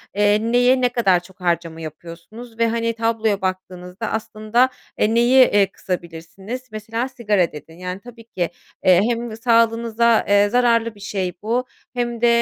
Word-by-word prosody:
eee, 205 +1 +3
neye 245 +3 +3
ne 250 - +3
kadar 200 -7 +2
çok 180 +2 -19
harcama 170 -2 -1
yapıyorsunuz 170 +9 -10
ve, 230 - +3
hani, 230 0 -1
tabloya 225 -2 0
baktığınızda 185 +2 -5
aslında, 220 +3 0 0.3
eee, 215 - +2
neyi, 250 +2 +6
eee, 205 -3 +3
kısabilirsiniz? 180 +7 -6
Mesela 225 +3 -3
sigara 210 -9 0
dedin. 160 +2 -12
Yani, 180 +1 -5
tabii 235 0 -13
ki, 180 -7 -3 0.4
eee, 185 -1 +6
hem 235 -2 -3
sağlığınıza, 230 -1 +2
eee, 205 0 +4
zararlı 230 -2 +2
bir 205 - -17
şey 190 -3 -3
bu 235 +4 -1 0.3
hem 240 -2 -3
de, 240 - +4
220 Hz, 155 wpm, -21 LUFS, 185-235 Hz, 0.4 s, neyi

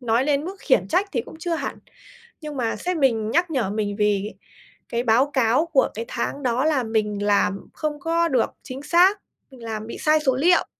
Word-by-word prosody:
nói 235 +1 +1
đến 290 0 +1
mức 385 +3 -6
khiển 195 - +2
trách 395 - +1
thì 240 - 0
cũng 315 - -13
chưa 335 +1 -2
hẳn. - - -4 0.6
Nhưng 300 -3 -6
mà 230 -2 -1
sếp 360 0 -3
mình 230 -6 +1
nhắc 345 +1 +1
nhở 255 -9 0
mình 205 -1 -2
vì 210 -1 +1 0.6
cái 235 +1 -1
báo 255 +5 +3
cáo 260 +3 +2
của 320 -6 +2
cái 225 +2 -5
tháng 280 +4 -3
đó 250 +2 +1
là 300 -5 +2
mình 210 -2 -1
làm 200 -1 +1
không 300 -1 -3
có 335 +3 +1
được 255 -6 +1
chính 260 +2 -7
xác, 370 +6 +4 0.3
mình 250 -3 -14
làm 220 -1 -5
bị - - -7
sai 310 0 +3
số 265 -4 +1
liệu. 345 +7 +3
260 Hz, 210 wpm, -23 LUFS, 225-310 Hz, 0.6 s, xác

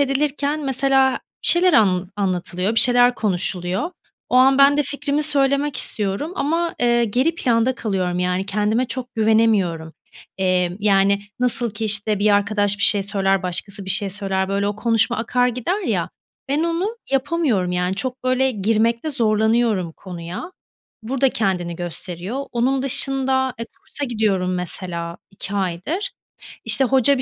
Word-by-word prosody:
edilirken 285 +1 0
mesela 270 0 +2 0.3
bir - - +1
şeyler 360 +1 +4
anlatı 190 -8 +3
anlatılıyor, 185 +1 -1
bir 225 - +6
şeyler 245 0 +5
konuşuluyor. 185 - -2 0.4
O - - +1
an 265 +1 +5
ben 280 +1 +6
de 295 - +3
fikrimi 285 +1 -2
söylemek 280 -1 +1
istiyorum 210 - -2
ama, 330 +4 -1
ııı, 240 0 +3
geri 255 +9 +1
planda 245 -3 +1
kalıyorum. 185 -6 -2
Yani 180 +1 -1
kendime 210 +4 0
çok 250 0 -7
güvenemiyorum. 215 -8 +1 0.5
Emm, 185 -1 +1
yani, 200 -1 +3 0.2
nasıl 245 -2 +2
ki 220 +2 -5
işte 210 0 +1
bir 210 +1 +3
arkadaş 205 0 +2
bir - - -2
şey, 205 -1 +5
söyler 195 -1 0
başkası 195 +3 -2
bir 190 - -4
şey 195 +1 +2
söyler, 190 -1 -2
böyle, 200 +1 0
o 205 - -4
konuşma 225 -1 +1
akar 245 +2 +1
gider 250 - -2
ya. - - -2 0.4
Ben 290 +3 +1
onu 350 +7 -2
yapamıyorum, 270 - 0
yani, 180 +1 -1
çok, 255 +6 -5
böyle, 255 +1 +2
girmekte 225 +5 0
zorlanıyorum 220 - +1
konuya. 180 - -8 0.5
Burada 265 +4 +1
kendini 180 -7 -2
gösteriyor. 180 - -5
Onun 260 +2 +1
dışında, 265 -1 +1
e, 230 - -4
kursa 285 +4 -8
gidiyorum 205 -7 0
mesela 175 -1 -5
2 195 +1 -6
aydır. 200 - -2 0.6
İşte, 270 - +3
hoca 265 +1 +3
bir - - -2
220 Hz, 150 wpm, -21 LUFS, 195-265 Hz, 0.6 s, bir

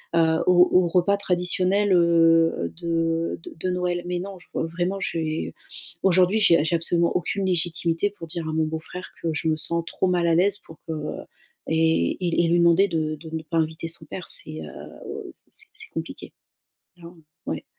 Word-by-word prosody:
heu, 160 -1 +4
au 180 0 +6
au 180 -1 +5
repas 180 +4 +2
traditionnel, 185 +1 +1
heu, 165 -1 +4
de 165 -1 0
de - - -9
de 185 - -1
Noël. 180 -1 -1
Mais 175 0 -2
non 195 +1 -6
je - - -21
re - - -1
vraiment, 180 +4 -2
j'ai 160 -3 -2 0.5
aujourd'hui 185 +2 +4
j'ai 170 -7 +5
j'ai 170 - +1
absolument 170 +1 +1
aucune 195 +2 -1
légitimité 170 +1 0
pour 185 -5 -9
dire 165 -1 -4
à - - -3
mon 160 0 +2
beau-frère 160 +3 -6
que - - -2
je 160 +2 -1
me 155 - +1
sens 170 +2 -2
trop 190 - -1
mal 175 -1 +1
à 165 - +3
l'aise 200 +4 +3
pour 160 - -15
que 160 - -2 0.7
et 160 - +2 0.2
et 170 0 +2
et - - +1
lui 175 0 +3
demander 170 +4 +5
de 155 -3 -1
de 160 +1 -11
ne 160 - -4
pas 160 +1 -3
inviter 160 +1 -1
son 160 -1 -11
père 180 +4 -7
c'est, 80 0 -2
heu, 75 - -9
c'est - - -31
c'est - - -10
c'est - - -6
compliqué. - - -6 0.7
Clairement. 170 0 -13 0.3
Ouais! - - -3
170 Hz, 190 wpm, -24 LUFS, 165-180 Hz, 0.7 s, au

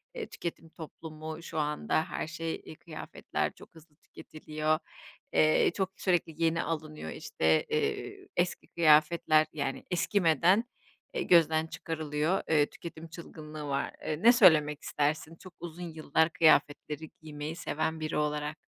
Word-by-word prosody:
eee, 460 - -4
tüketim 165 -1 -6
toplumu 160 0 -8
şu 160 - -4
anda 150 +1 0
her 170 - -4
şey, 160 +1 -3
eee, - - -9
kıyafetler 155 0 -4
çok - - -17
hızlı 160 -2 -18
tüketiliyor, 155 -1 -3 0.5
eee, 155 +1 +4
çok 190 -2 0
sürekli 170 -3 0
yeni 165 0 +2
alınıyor 155 - -4
işte, 80 0 +1
eee, - - -2
eski 175 0 -1
kıyafetler 155 0 +4
yani 140 -3 -3
eskimeden 180 - +3 0.5
e 465 -6 -1
gözden 160 -2 +4
çıkarılıyor, 160 +1 -2
eee, 155 -2 +5
üketim 165 -1 -8
çılgınlığı 155 -2 -9
var 140 0 -1
Eee, 155 +2 -2
ne 235 - +9
söylemek 155 - +5
istersin 155 +2 -1
çok 185 +2 -14
uzun 175 +1 -7
yıllar 160 +1 +2
kıyafetleri 155 -1 +2
giymeyi 155 +1 -6
seven 160 -2 -2
biri 155 0 -2
olarak? 150 0 -1
160 Hz, 135 wpm, -30 LUFS, 150-170 Hz, 0.5 s, ne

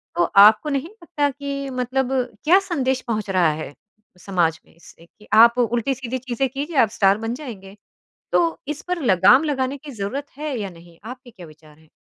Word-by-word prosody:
तो 175 - +2 0.2
आपको 220 +8 +1
नहीं 280 +3 -2
लगता 340 -8 -3
कि 280 0 -5
मतलब 260 +1 -1 0.3
क्या 355 +5 +6
संदेश 265 -6 -1
पहुँच 215 -3 -3
रहा 180 -4 +2
है 145 - -9 0.5
समाज 170 -4 -1
में - - -25
इससे 170 0 -18
कि 210 +5 -22
आप 235 +2 +7
उल्टी-सीधी 240 +2 -1
चीज़ें 255 +1 -2
कीजिए 285 +4 -5
आप 230 -5 +4
स्टार 195 0 +4
बन 225 +1 -4
जाएँगे। 210 -8 -10 0.5
तो 335 -1 +1
इस 300 0 -4
पर 360 -2 -2
लगाम 200 - +5
लगाने 275 -2 -2
की 290 +1 -11
ज़रूरत 250 +6 -5
है 300 -2 -4
या 200 -2 -4
नहीं? 170 -1 -17
आपके 250 +1 -10
क्या 185 -5 -13
विचार 155 -1 -19
हैं? 160 -1 -24
245 Hz, 185 wpm, -21 LUFS, 195-280 Hz, 0.5 s, आप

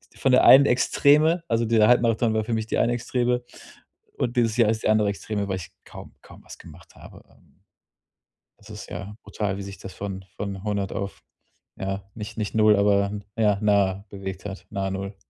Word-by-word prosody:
von 135 - +1
der 125 - +5
einen 140 +1 +8
Extreme 150 +6 +3
also 115 0 0
dieser 110 -1 +4
Halbmarathon 115 -2 +3
war 110 0 0
für 115 +1 -3
mich 110 -1 -1
die - - -2
eine 120 +1 +2
Extreme. 125 0 -1 0.7
Und 120 +1 -2
dieses 115 -1 +1
Jahr 115 -3 +4
ist 110 - -3
die - - +1
andere 105 -1 +3
Extreme, 100 0 -4
weil 95 -1 -2
ich 90 - -9
kaum - - -12
kaum - - -16
was - - -12
gemacht - - -16
habe, - - -14
ähm. - - -27 1.0
Das 105 - -18
ist 105 -1 -9
ja 100 +4 -7
brutal, 100 -3 -3
wie 100 - -6
sich 100 0 -9
das 95 - -9
von 95 -1 -6
von 100 -2 -5
100 100 -2 -2
auf, 100 0 -5 0.6
ja, 95 +1 -4
nicht 105 -1 -8
nicht 105 -2 -3
0, 110 -1 +5
aber 100 0 +2 0.3
ja, 105 -3 +2
nah 100 -2 +2
bewegt 95 -1 -7
hat, 95 -1 -7
nahe 95 -1 -2
0. 95 +1 -5
105 Hz, 195 wpm, -24 LUFS, 100-115 Hz, 1.0 s, einen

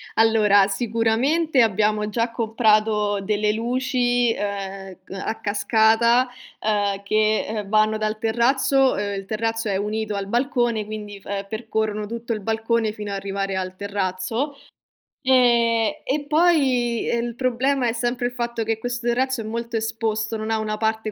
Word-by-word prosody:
Allora, 210 -3 +5
sicuramente 240 +8 +1
abbiamo 210 -1 +1
già 230 +1 -1
comprato 215 -3 +1
delle 210 +1 0
luci, 245 0 +1
ehm, 195 -2 -5
c - - -18
a 220 +3 -4
cascata, 225 +3 +3 0.3
ehm, 205 -2 0
che, 215 +1 +1
ehm, 210 -2 -4
vanno 215 +1 +3
dal 215 0 -2
terrazzo, 260 +4 +2
ehm, 200 -1 -2
il 195 - -9
terrazzo 225 +1 -2
è 195 - 0
unito 210 +1 -2
al 200 0 -3
balcone, 240 -2 0
quindi 210 -2 -7
f - - -25
ehm, 200 0 -4
percorrono 220 -1 -2
tutto 235 +1 -4
il 215 - -5
balcone 225 +1 0
fino 210 -1 -6
a - - -2
arrivare 195 0 -3
al 185 0 -3
terrazzo. 200 +7 -2 0.6
Ehm, 235 -4 +3
e 285 +2 -1
poi 275 -8 +2
il 235 0 -1
problema 255 +1 +1
è 225 - -1
sempre 240 +1 -1
il 245 - -5
fatto 235 -1 -2
che 225 0 -1
questo 245 0 -4
terrazzo 260 +1 0
è - - -6
molto 235 +2 -4
esposto, 220 0 -2
non 215 +1 -5
ha 220 - +1
una 215 0 -2
parte 220 0 -1
220 Hz, 155 wpm, -23 LUFS, 210-240 Hz, 0.6 s, Allora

